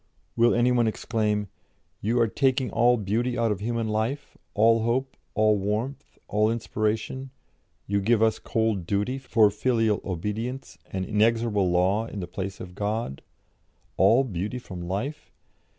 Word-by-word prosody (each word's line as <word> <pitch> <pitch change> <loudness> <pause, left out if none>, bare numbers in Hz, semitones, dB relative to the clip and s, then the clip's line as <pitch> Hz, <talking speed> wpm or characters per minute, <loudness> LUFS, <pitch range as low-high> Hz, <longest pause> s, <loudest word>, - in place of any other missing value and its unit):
"Will 120 +1 +4
any 120 +1 +3
one 120 -2 +3
exclaim, 105 -2 -1 0.5
'You 115 +4 +1
are 115 - +4
taking 130 +2 +1
all 120 +2 +4
beauty 115 +4 -1
out 115 -2 +2
of 100 - -2
human 115 +1 -2
life, 110 +7 -2 0.2
all 115 +2 +4
hope, 130 +4 -1 0.2
all 110 -1 +3
warmth, 110 +8 -3
all 105 +1 +2
inspiration; 115 +3 -2 0.6
you 100 0 0
give 115 +3 +3
us 110 -1 +2
cold 110 -6 -1
duty 105 +8 0
for 115 -5 +3
filial 110 0 +1
obedience, 105 +9 -4
and 95 -1 -3
inexorable 110 -2 +2
law 95 +5 +2
in 105 - -6
the 90 - -3
place 95 +2 -5
of 90 -1 -8
God'? 105 - -3 0.7
All 115 +8 +5
beauty 105 0 -3
from 95 -8 -8
life? 100 - -4
110 Hz, 150 wpm, -26 LUFS, 100-120 Hz, 0.7 s, All